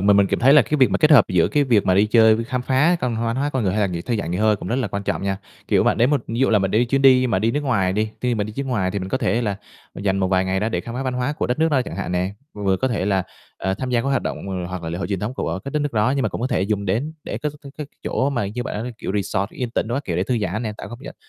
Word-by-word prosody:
mà 100 +2 +4
mình 100 -1 +5
cảm - - -1
thấy 135 +3 +6
là 150 -3 +7
cái 150 +8 -1
việc 130 -2 +4
mà - - +1
kết 155 -1 +4
hợp 140 -8 +8
giữa 90 -3 +3
cái 145 -1 +2
việc 115 -6 +2
mà 95 - +4
đi 100 +3 +4
chơi 110 0 +5
với 115 - -2
khám 125 +1 -3
phá 145 +8 +3
văn 120 -3 -1
hóa 115 0 -1
hoá 140 +3 -1
con 130 -4 -1
người, 95 - +1
hay 105 - 0
là 100 - +3
nghỉ 90 -3 -4
thư 120 +3 -1
giãn, 100 -5 -3
nghỉ 90 - -2
hơi 110 0 +3
cũng - - -7
rất 120 - 0
là 125 -5 -1
quan 100 0 -4
trọng - - -2
nha. 95 0 -1 0.3
Kiểu, - - +3
bạn - - +2
đến 120 +4 +4
một 145 - +2
ví 115 - -4
dụ 135 - +4
là 110 - +4
mình 95 -1 0
đi 115 +3 +3
chuyến 135 +3 0
đi 130 -1 +6
mà 115 -6 +1
đi 110 +4 +1
nước 145 - -1
ngoài 100 -9 +1
đi, 110 +2 -1
khi 125 -1 0
mà 105 - -1
đi 105 - -7
chuyến 135 +5 -4
ngoài 100 -8 0
thì 100 - -2
mình 95 - -5
có 130 - -1
thể 120 +1 0
là 100 -3 -1 0.4
dành 95 -1 -1
một 95 -1 +1
vài 95 0 +2
ngày 95 0 -1
đó 110 - 0
để - - -2
khám 115 - -8
phá 130 - -3
văn 130 -1 -2
hóa 125 +3 -1
của - - -2
đất 125 - -1
nước 160 +1 +3
đó, 130 -3 +2
chẳng - - -7
hạn - - -3
nè, 90 +2 -1 0.2
vừa 100 -2 0
có 130 - 0
thể 110 -5 -1
là, 95 -2 +1 0.3
ờ, 95 0 -1
tham 130 +5 -4
gia 120 -2 +2
các 135 - -2
hoạt 135 -1 +1
động - - -3 0.3
hoặc 95 -1 -5
là 80 - -4
lễ 85 - -4
hội 95 - -3
truyền 100 -2 -2
thống 110 +5 -3
của 115 - -2
các 140 - -6
đất 150 - 0
nước 145 - -2
đó. 110 +3 +2
Nhưng 135 - +1
mà - - +1
cũng - - -6
có 125 - 0
thể 95 - 0
dùng 100 0 -1
đến 120 +12 -1
để - - -4
có 150 - -2
cái 140 -1 -11
cái 150 - -4 0.2
chỗ 135 +2 0
mà 120 -7 -1
như 115 +5 -4
bạn, 120 -1 -4
kiểu, - - -4
resort 100 0 -1
yên 125 -2 -4
tĩnh 115 - -1
đồ 120 - -1
các 140 0 -2
kiểu, 85 -2 -2
để 90 - +1
thư 120 +2 0
giãn 105 +2 -2
nè, 110 -2 -3
tạo - - -8
không 120 +4 -10
gian - - -8
115 Hz, 365 wpm, -21 LUFS, 100-130 Hz, 0.4 s, hợp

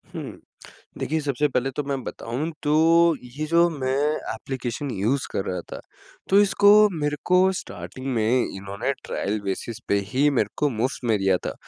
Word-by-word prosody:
हुँ। - - -7 0.6
देखिए 160 +1 -1
सबसे 145 -1 0
पहले 130 0 0
तो 150 - 0
मैं 135 -1 -3
बताऊँ 130 +8 -4
तो 150 - 0 0.7
ये 155 - -1
जो 170 +2 +4
मैं 130 -5 -2 0.4
एप्लीकेशन 130 +3 -4
यूज़ 120 +6 0
कर 95 - -2
रहा 90 -3 -3
था, - - -5 0.5
तो 195 - +5
इसको 205 +1 +6
मेरे 150 0 0
को 180 0 +4
स्टार्टिंग 130 -7 -7
में 115 +3 +2
इन्होंने 100 +7 -3
ट्रायल 105 +2 -2
बेसिस 100 +3 -4
पे 100 - +3
ही 135 +7 +2
मेरे 120 -7 +1
को 150 - +2
मुफ़्त 125 +3 -2
में 110 - +4
दिया 95 -1 +2
था। - - -3
130 Hz, 170 wpm, -24 LUFS, 110-150 Hz, 0.7 s, इसको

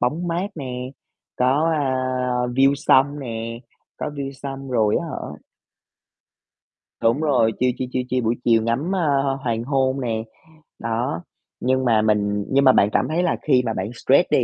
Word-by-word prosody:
bóng 160 +8 -1
mát 175 +3 -1
nè, 125 -3 -5 0.5
có, 140 +6 +2
a, 140 -4 0 0.5
view 135 +3 +3
sông 140 0 +3
nè, 115 -2 -5 0.4
có - - -4
view 140 -2 -5
sông 135 0 -7
rồi 110 -4 +2
á 170 - -2
hả 75 - -6 1.6
Đúng 115 +6 +3
rồi, 130 -7 +2
chill 125 0 +3
chill, 130 - -3
chill 125 -1 -1
chill 125 -2 0
buổi 115 +2 +2
chiều 115 -2 +4
ngắm, 130 +11 -1
a, - - 0
a, 140 -4 +2
hoàng 115 -1 -1
hôn 135 0 0
nè, 115 -3 -2 0.6
đó. 120 +8 -2 0.4
Nhưng 130 +1 +1
mà 110 -3 +4
mình 105 -1 +1
nhưng 140 +1 +3
mà 130 - +8
bạn 100 - +4
cảm 125 - +1
thấy 170 +3 0
là - - +1
khi 130 -4 +3
mà 115 - -1
bạn 95 0 -3
stress - - +3
đi, - - +4
130 Hz, 180 wpm, -22 LUFS, 115-140 Hz, 1.6 s, mà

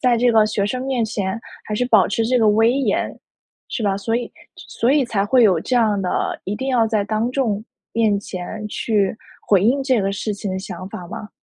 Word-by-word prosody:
在 250 -3 +3
这 245 0 +4
个 220 -1 +5
学 210 -2 -1
生 255 +4 -3
面 255 -3 0
前 200 -1 -2 0.3
还 215 - -4
是 250 - +1
保 220 -6 +5
持 225 +3 0
这 250 +1 +2
个 225 - +3
威 225 +3 +4
严， 275 0 -1 0.5
是 235 - -3
吧？ 195 -2 +1
所 225 +3 -2
以 245 - -4 0.3
所 240 +4 -1
以 290 -3 +3
才 200 -4 0
会 250 +3 +4
有 190 -6 +5
这 255 - -2
样 215 -4 +2
的， 180 - -1
一 200 - -2
定 265 +1 -3
要 235 -4 +3
在 215 -2 +1
当 220 +3 -1
众 220 -6 -1 0.3
面 215 -3 +2
前 205 +2 -6
去 210 -2 0 0.3
回 195 -2 +4
应 265 +5 +3
这 260 -4 +2
个 195 - 0
事 205 +1 -3
情 200 0 -5
的 190 - -2
想 185 -1 -7
法 175 - -7
吗？ 210 - -7
220 Hz, 240 characters per minute, -20 LUFS, 200-245 Hz, 0.5 s, 个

